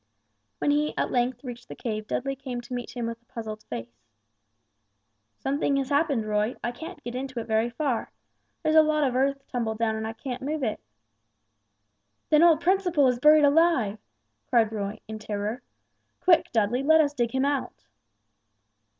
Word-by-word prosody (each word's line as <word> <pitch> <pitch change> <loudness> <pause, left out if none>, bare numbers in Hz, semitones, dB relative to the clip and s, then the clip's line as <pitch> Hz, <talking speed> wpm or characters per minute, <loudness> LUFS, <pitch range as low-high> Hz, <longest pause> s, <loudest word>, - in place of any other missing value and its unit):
When 290 - +1
he 300 +1 0
at - - 0
length 250 +2 0
reached 245 -2 -8
the - - -8
cave 215 -2 -4
Dudley 275 +4 -2
came 260 -2 -5
to 250 - -9
meet 245 0 -5
him 240 - -2
with 230 0 -5
a - - -38
puzzled 220 -2 -7
face. 115 -1 -8 1.3
"Something 280 +1 0
has 270 -1 -1
happened, 285 -6 +1
Roy. 210 +2 0
I 240 - -1
can't 325 +9 -9
get 240 - -5
into 260 -1 -4
it 225 - -5
very 220 +1 +1
far; 245 0 -2 0.5
there's 310 -1 +2
a 315 - +9
lot 305 -1 +2
of 260 -3 0
earth 275 +1 0
tumbled 225 -3 -2
down 225 -1 0
and 220 0 -3
I 225 - -4
can't 250 +2 -6
move 295 +2 -2
it." 220 -3 -1 1.5
"Then 305 0 +6
old 335 -2 +6
Principle 355 -6 +3
is 245 -1 -1
buried 300 +2 +7
alive!" 285 -9 +3 0.5
cried 225 -2 +3
Roy 205 -1 -4
in 220 0 -6
terror. 215 +3 -3 0.6
"Quick, 345 -3 +4
Dudley, 230 +3 +1
let 315 +3 +5
us 290 -2 +3
dig 240 -4 0
him 265 +3 0
out." 275 - -2
250 Hz, 175 wpm, -26 LUFS, 225-290 Hz, 1.5 s, a